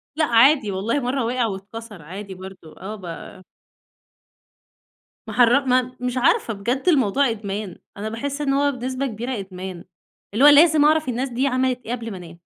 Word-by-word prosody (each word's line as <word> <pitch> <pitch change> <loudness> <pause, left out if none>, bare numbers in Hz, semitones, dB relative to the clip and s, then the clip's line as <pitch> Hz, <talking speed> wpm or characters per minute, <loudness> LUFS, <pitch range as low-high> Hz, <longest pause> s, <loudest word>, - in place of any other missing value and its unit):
لأ، 315 0 +2
عادي 240 -2 +4
والله 210 +9 -1
مرّة 250 0 -1
وقع 245 0 0
واتكسر، 205 0 -7
عادي 190 +5 -8
برضه 185 -4 -12
آه 210 +3 -6
ب 185 -1 -9 1.8
ماحر 245 +4 +3
ما 255 0 +1
مش 250 0 -3
عارفة 255 - +2
بجد 240 +7 -2
الموضوع 270 - +3
إدمان، 205 -3 -5 0.2
أنا 215 +2 -4
باحس 280 +6 -4
إن 275 -2 0
هو 285 +1 +2
بنسبة 255 +1 -3
كبيرة 240 +1 -4
إدمان، 185 -2 -8 0.5
اللي 230 +6 +2
هو - - +10
لازم 300 0 +6
أعرف 310 -3 +3
الناس 250 +3 -2
دي 255 +3 0
عملت 255 -1 0
إيه 230 - -5
قبل 230 -2 -4
ما 190 - -6
انام، 170 -1 -12
235 Hz, 170 wpm, -22 LUFS, 200-265 Hz, 1.8 s, هو